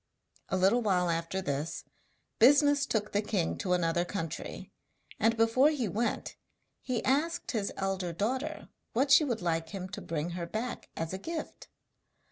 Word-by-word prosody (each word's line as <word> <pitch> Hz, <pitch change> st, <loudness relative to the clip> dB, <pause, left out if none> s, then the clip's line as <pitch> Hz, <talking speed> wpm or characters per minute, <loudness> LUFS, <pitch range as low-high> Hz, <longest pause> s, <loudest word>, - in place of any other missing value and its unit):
A 190 Hz, -, +1 dB
little 195 Hz, +6 st, +4 dB
while 180 Hz, -5 st, +2 dB
after 165 Hz, +3 st, -2 dB
this, 145 Hz, 0 st, -3 dB, 0.6 s
business 285 Hz, +3 st, +6 dB
took 210 Hz, -1 st, -1 dB
the 205 Hz, -, +1 dB
king 200 Hz, -5 st, -1 dB
to 180 Hz, -3 st, 0 dB
another 170 Hz, -1 st, +2 dB
country, 165 Hz, -3 st, -5 dB, 0.5 s
and 230 Hz, +1 st, +3 dB
before 230 Hz, +6 st, +5 dB
he 275 Hz, -7 st, -1 dB
went 225 Hz, +5 st, -2 dB, 0.4 s
he 245 Hz, -3 st, -2 dB
asked 315 Hz, +6 st, +1 dB
his 210 Hz, -5 st, -1 dB
elder 190 Hz, -2 st, -1 dB
daughter 225 Hz, -, -2 dB, 0.2 s
what 270 Hz, +4 st, +2 dB
she 275 Hz, +3 st, +8 dB
would 235 Hz, -9 st, -2 dB
like 165 Hz, -1 st, 0 dB
him 190 Hz, -2 st, -5 dB
to 205 Hz, +2 st, -6 dB
bring 165 Hz, +1 st, -3 dB
her 170 Hz, -1 st, -4 dB
back 225 Hz, +6 st, -4 dB
as 165 Hz, +2 st, -3 dB
a 190 Hz, -, -3 dB
gift. 325 Hz, -, -6 dB
205 Hz, 160 wpm, -30 LUFS, 175-250 Hz, 0.6 s, she